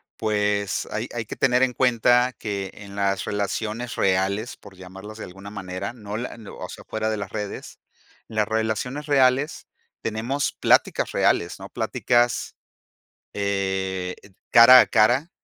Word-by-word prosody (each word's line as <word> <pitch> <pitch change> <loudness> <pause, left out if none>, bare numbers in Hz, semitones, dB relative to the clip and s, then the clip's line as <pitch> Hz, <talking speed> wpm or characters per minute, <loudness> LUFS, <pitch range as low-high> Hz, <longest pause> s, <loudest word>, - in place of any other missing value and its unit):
pues, 105 -2 0
hay 110 +3 -3
hay 115 -2 -3
que - - -7
tener 125 0 +3
en 125 -1 +2
cuenta 125 0 +3
que 100 -3 -4
en 100 -1 -11
las 100 -1 0
relaciones 105 +3 -3
reales, 100 +4 0
por 95 -2 -16
llamarlas 95 +4 -10
de - - -7
alguna 95 +3 -11
manera, 95 -2 -5
no 105 -4 -8
la 120 +1 -5
no 110 -3 -11
o - - -7
sea, - - -11
fuera 110 0 -2
de 110 - -1
las 100 -2 -5
redes, 105 -2 -6 0.5
las 110 -1 0
relaciones 110 +6 -2
reales 135 +1 +2 0.3
tenemos 115 +6 -2
pláticas - - +2
reales, 85 +2 +1
¿no? 95 - -8
Pláticas, 120 0 0 0.8
eh, 95 -2 -2
ed 100 - -18 0.2
cara 125 +2 +9
a - - +4
cara 120 +9 +3
110 Hz, 150 wpm, -24 LUFS, 100-120 Hz, 0.8 s, cara